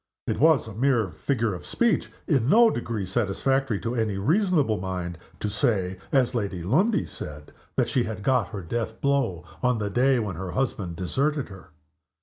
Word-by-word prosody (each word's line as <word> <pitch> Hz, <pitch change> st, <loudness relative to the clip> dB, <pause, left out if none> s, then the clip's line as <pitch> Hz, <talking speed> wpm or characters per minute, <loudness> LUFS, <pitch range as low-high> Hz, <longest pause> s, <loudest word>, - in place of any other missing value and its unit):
It -, -, -2 dB
was 155 Hz, -5 st, +4 dB
a 110 Hz, -, -7 dB
mere 115 Hz, -4 st, +1 dB
figure 115 Hz, -4 st, -1 dB
of 90 Hz, -, -7 dB
speech 235 Hz, -3 st, +1 dB, 0.2 s
in 135 Hz, -7 st, +2 dB
no 230 Hz, +4 st, +6 dB
degree 115 Hz, -4 st, -3 dB
satisfactory 120 Hz, +4 st, 0 dB
to 115 Hz, -, -2 dB
any 110 Hz, -5 st, 0 dB
reasonable 155 Hz, -, +2 dB
mind 90 Hz, -2 st, -4 dB, 0.2 s
to -, -, -2 dB
say, 100 Hz, -4 st, 0 dB
as 130 Hz, -3 st, +3 dB
Lady 100 Hz, -7 st, -2 dB
Lundie 185 Hz, -, +2 dB
said, 75 Hz, 0 st, -8 dB, 0.2 s
that -, -, +2 dB
she 130 Hz, -, +1 dB
had 105 Hz, -2 st, -5 dB
got 125 Hz, -6 st, +2 dB
her 95 Hz, +1 st, -7 dB
death 110 Hz, +5 st, -3 dB
blow 130 Hz, -12 st, 0 dB, 0.2 s
on 125 Hz, -1 st, +2 dB
the 105 Hz, -2 st, -2 dB
day 130 Hz, +4 st, +3 dB
when 105 Hz, -7 st, -2 dB
her 95 Hz, +1 st, -5 dB
husband 100 Hz, -10 st, -2 dB
deserted 140 Hz, -, -1 dB
her. 95 Hz, -3 st, -12 dB
115 Hz, 175 wpm, -26 LUFS, 95-135 Hz, 0.2 s, no